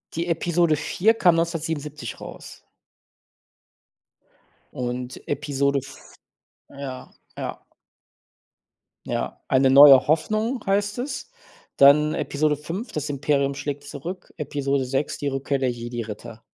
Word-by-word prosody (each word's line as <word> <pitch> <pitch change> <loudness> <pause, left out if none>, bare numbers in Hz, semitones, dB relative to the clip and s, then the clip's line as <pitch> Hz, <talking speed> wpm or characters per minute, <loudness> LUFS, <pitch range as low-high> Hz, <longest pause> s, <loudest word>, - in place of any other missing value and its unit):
Die 165 +1 -1
Episode 170 -1 +2
4 180 +8 +2
kam 180 -7 +4
1977 155 - -3
raus. - - -11 2.1
Und 125 0 -5
Episode 140 -1 0
f 135 +1 -11 0.7
Ja, 135 -2 -8 0.3
ja. - - -5 1.5
Ja. - - -3
„Eine 130 0 +4
neue 135 -1 +9
Hoffnung“, 215 - 0
heißt 205 +2 0
das. 270 - -5 0.5
Dann 150 +2 +6
Episode 150 +1 0
5- 170 - -6
„Das 150 0 -3
Imperium 140 -1 0
schlägt 145 0 -5
zurück“, 175 +7 -8
Episode 140 -2 -1
6- 135 +3 -2
„Die 145 - -2
Rückkehr 135 +1 -1
der 130 -2 +1
Jedi-Ritter“. 115 -2 -7
145 Hz, 110 wpm, -24 LUFS, 135-165 Hz, 2.1 s, neue